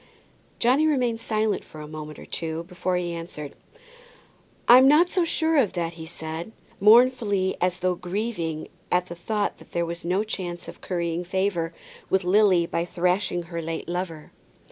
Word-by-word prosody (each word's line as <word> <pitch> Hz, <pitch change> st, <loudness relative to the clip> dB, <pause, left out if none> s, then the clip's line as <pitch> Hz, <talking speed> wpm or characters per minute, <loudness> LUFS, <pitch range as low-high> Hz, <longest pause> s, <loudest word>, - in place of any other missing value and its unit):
Johnny 265 Hz, +6 st, +3 dB
remained 245 Hz, -6 st, +1 dB
silent 215 Hz, -2 st, 0 dB
for 155 Hz, -, -13 dB
a 150 Hz, -, -7 dB
moment 155 Hz, 0 st, -8 dB
or -, -, -10 dB
two 165 Hz, 0 st, -4 dB
before 180 Hz, +1 st, -2 dB
he 175 Hz, -1 st, -1 dB
answered. 165 Hz, -4 st, -7 dB, 1.1 s
"I'm 255 Hz, +2 st, +9 dB
not 320 Hz, +5 st, +5 dB
so 365 Hz, -, +2 dB
sure 325 Hz, -1 st, +1 dB
of 235 Hz, -9 st, +3 dB
that," 170 Hz, -2 st, -2 dB
he 160 Hz, -1 st, -9 dB
said, 160 Hz, +4 st, -6 dB, 0.3 s
mournfully, 215 Hz, -3 st, +5 dB
as 180 Hz, 0 st, +1 dB
though 185 Hz, 0 st, +2 dB
grieving 180 Hz, -3 st, -3 dB, 0.2 s
at 180 Hz, 0 st, +2 dB
the 175 Hz, -, -6 dB
thought 205 Hz, +4 st, -2 dB
that -, -, -17 dB
there 170 Hz, 0 st, +1 dB
was 170 Hz, 0 st, -6 dB
no 185 Hz, +4 st, +1 dB
chance 180 Hz, -5 st, -5 dB
of -, -, -10 dB
currying 170 Hz, -1 st, -2 dB
favour 180 Hz, -2 st, -1 dB, 0.4 s
with 190 Hz, 0 st, +2 dB
Lily 185 Hz, -2 st, +4 dB
by 170 Hz, 0 st, -1 dB
thrashing 180 Hz, +1 st, 0 dB
her 170 Hz, 0 st, -5 dB
late 165 Hz, 0 st, -4 dB
lover. 175 Hz, -3 st, -4 dB
180 Hz, 165 wpm, -25 LUFS, 170-215 Hz, 1.1 s, I'm